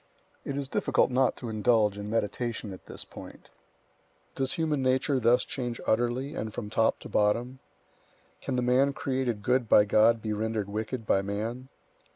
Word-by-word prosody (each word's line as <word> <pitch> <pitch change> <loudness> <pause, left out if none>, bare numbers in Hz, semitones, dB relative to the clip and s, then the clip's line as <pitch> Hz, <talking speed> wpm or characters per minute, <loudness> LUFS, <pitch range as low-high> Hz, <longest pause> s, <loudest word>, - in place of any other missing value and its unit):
It 140 - -4
is 140 -1 -3
difficult 135 - +1
not 130 +1 +2
to 120 - -6
indulge 110 -1 +2
in 105 0 -6
meditation 110 -1 -2
at 90 - -13
this - - -6
point. - - -12 0.8
Does 135 -1 -1
human 155 -4 0
nature 130 +1 +1
thus 120 +1 +3
change 120 -3 -4
utterly 120 +5 0
and 110 -9 -4
from 105 -1 -6
top 110 0 +2
to - - -8
bottom? 120 +5 0 0.8
Can - - -3
the 125 - 0
man 130 +3 +3
created 130 -6 -2
good 125 0 +1
by 105 - +7
God 110 +3 +4
be 110 -1 -3
rendered 110 -1 -2
wicked 110 +3 -4
by 95 - +2
man? 110 +6 -4
120 Hz, 170 wpm, -28 LUFS, 110-130 Hz, 0.8 s, by